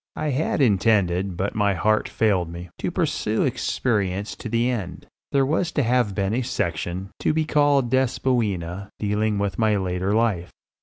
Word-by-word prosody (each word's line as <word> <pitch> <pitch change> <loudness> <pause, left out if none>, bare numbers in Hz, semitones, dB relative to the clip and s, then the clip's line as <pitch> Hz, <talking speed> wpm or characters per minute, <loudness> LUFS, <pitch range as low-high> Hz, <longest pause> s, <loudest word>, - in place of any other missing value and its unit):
I 155 -1 -1
had 145 +2 0
intended, 95 -4 +2
but 95 +2 -1
my 100 -2 +1
heart 110 +5 +1
failed 95 -6 +1
me, 85 0 -8
to - - -1
pursue - - 0
experience 100 -4 -1
to 115 - -6
the 115 +2 +1
end. 105 -9 -4 0.3
There 135 -1 +3
was 160 +4 0
to 145 - +1
have 120 -4 +1
been 100 0 0
a 125 - +1
section, 90 -4 -3
to - - +1
be 160 -1 +1
called 145 -5 +2
"Despoina," 105 -8 0
dealing 105 0 0
with 100 +1 -2
my 110 -2 +3
later 95 0 -1
life. 105 -6 +1
105 Hz, 165 wpm, -23 LUFS, 95-125 Hz, 0.3 s, There